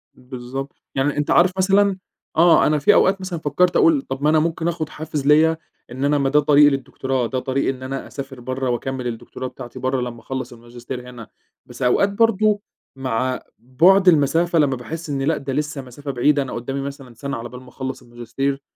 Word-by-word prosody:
بالضبط. 130 +2 -7 0.2
يعني 140 +2 0
أنت 145 - 0
عارف 180 +2 +5
مثلًا 195 +1 +3 0.4
آه، 170 +1 +6
أنا 150 0 +2
في 145 - +5
أوقات 195 0 +3
مثلًا 185 -3 -4
فكّرت 165 +4 +1
أقول، 320 -5 +4
طَب 135 - -6
ما 150 - +4
أنا 155 0 +4
ممكن 165 +1 -1
آخُد 160 -3 -2
حافز 150 -3 -5
ليَّ 160 +2 +5 0.3
إن 130 +3 -3
أنا 145 +1 +2
ما 135 -1 +1
ده 150 +2 +4
طريقي 145 0 +6
للدكتوراه، 130 -2 -2
ده 130 - -2
طريقي 130 +1 -1
إن 130 -1 -4
أنا 135 +1 -5
أسافر 135 -2 -8
برّه 130 +1 -3
وأكمّل 125 +1 -3
الدكتوراه 120 +2 -6
بتاعتي 125 0 -10
برّه 130 +1 -1
لمّا 120 -1 -5
أخلّص 130 +1 -5
الماجستير 120 +1 -9
هنا، 120 -3 -10 0.4
بس - - -12
أوقات 125 +10 +3
برضه 215 -1 +2 0.3
مع 130 -1 -2 0.2
بُعد 175 +11 +4
المسافة 165 +1 +4
لمّا 140 -3 +2
باحس 160 +6 -7
إن 140 -1 -2
لأ، 150 +3 +1
ده 135 -1 -5
لسه 150 0 -2
مسافة 135 +3 -7
بعيدة، 140 +3 +2
أنا 135 - -5
قُدّامي 135 +4 -4
مثلًا 135 -2 -8
سَنة 140 +2 -5
على 115 +1 -7
بال 125 0 -10
ما 130 - -15
أخلّص 130 +1 -6
الماجستير، 125 +3 -4
135 Hz, 200 wpm, -21 LUFS, 130-155 Hz, 0.4 s, آه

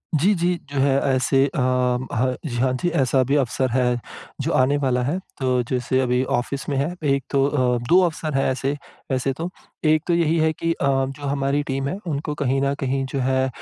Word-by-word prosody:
जी, 185 +8 +3
जी, 175 +1 +1 0.2
जो 135 - 0
है 135 0 +3 0.2
ऐसे 135 +1 +3
अ 155 - -4
ह 125 0 0
जी, 120 -5 -4
हाँ 130 +1 +2
जी, 175 - +1
ऐसा 130 -3 +2
भी 135 +3 0
अवसर 130 -1 +1
है, 125 -1 +1 0.4
जो - - -1
आने 135 +3 +3
वाला 130 -3 +1
है। 150 +8 -1 0.2
तो 130 -1 +1
जैसे 130 +1 0
अभी 125 0 +1
ऑफ़िस 130 +2 -2
में 140 - 0
है 150 +6 0 0.2
एक 140 - -1
तो 140 -1 +2
अ, 125 -4 +1
2 180 +2 +7
अवसर 155 -3 -2
हैं 135 - +2
ऐसे 135 +2 -1 0.4
वैसे 130 +1 0
तो। 165 +6 -4 0.4
एक 155 0 +3
तो 175 - +2
यही 165 -1 +2
है 160 0 +3
कि 165 +2 -1
अ, - - -3
जो 135 +1 0
हमारी 140 +1 0
टीम 135 -1 -2
है, 185 - -3
उनको 150 0 -2
कहीं 135 -1 0
न 140 0 +1
कहीं 135 0 -1
जो 135 +1 -3
है 130 +1 +1
135 Hz, 215 wpm, -22 LUFS, 130-145 Hz, 0.4 s, 2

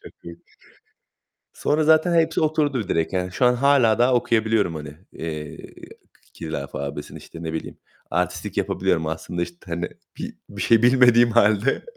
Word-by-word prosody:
çok - - -13
iyi. 85 0 -11 1.1
Sonra 155 +1 0
zaten 160 +3 +4
hepsi 165 -1 +2
oturdu 145 - 0
direkt 80 +3 0
yani 90 0 -2
şu 125 - 0
an 125 - +5
hâlâ 125 -4 +3
daha 125 +1 +3
okuyabiliyorum, 110 -6 +1
hani, 75 -1 -8 0.2
eee, 75 -2 -6 0.8
Kiril 80 -2 -6
alfabesini, 70 +1 -6
işte 85 - -12
ne 80 -1 -4
bileyim. 80 - -6 0.3
Artistlik - - -2
yapabiliyorum 80 -1 0
aslında 80 +2 -4
işte, 85 0 -6
hani, 85 +1 -3 0.3
bi - - -6
bir - - -6
şey 115 -1 +4
bilmediğim 120 -1 +5
halde. 110 +2 +2
110 Hz, 150 wpm, -22 LUFS, 85-125 Hz, 1.1 s, an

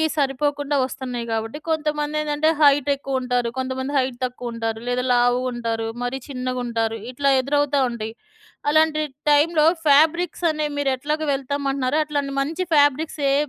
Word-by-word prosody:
సరిపోకుండా 290 0 0
వస్తున్నాయి 255 -2 -4
గాబట్టి 225 +5 -3
కొంతమందేంటంటే 300 0 0
హైట్ 285 -1 +5
ఎక్కువ 270 -1 -3
ఉంటారు. 245 -2 0
కొంతమంది 260 +1 -3
హైట్ 255 -2 0
తక్కువ 245 -1 -6
ఉంటారు 225 -1 -3
లేదా 250 0 0
లావుగా 245 +1 +2
ఉంటారు, 230 -1 -2 0.2
మరీ 250 +2 -2
చిన్నగా 255 -2 -3
ఉంటారు. 225 -1 -1
ఇట్లా 275 +2 +1
ఎదురవుతా 285 +1 +1
ఉంటాయి. 225 -2 -5 0.6
అలాంటి 310 0 +3 0.3
టైమ్‌లో 305 +1 +4 0.2
ఫాబ్రిక్స్ 320 +4 +3
అనే 305 -1 -1
మీరు 285 -2 +1
ఎట్లాగా 300 +4 -2
వెళ్తాం 280 +1 -3
అంటున్నారో 270 +2 0
అట్లాంటి 285 -2 -2
మంచి 325 +6 -2
ఫాబ్రిక్స్ 290 +2 +2
ఏ - - +3
275 Hz, 140 wpm, -22 LUFS, 250-295 Hz, 0.6 s, హైట్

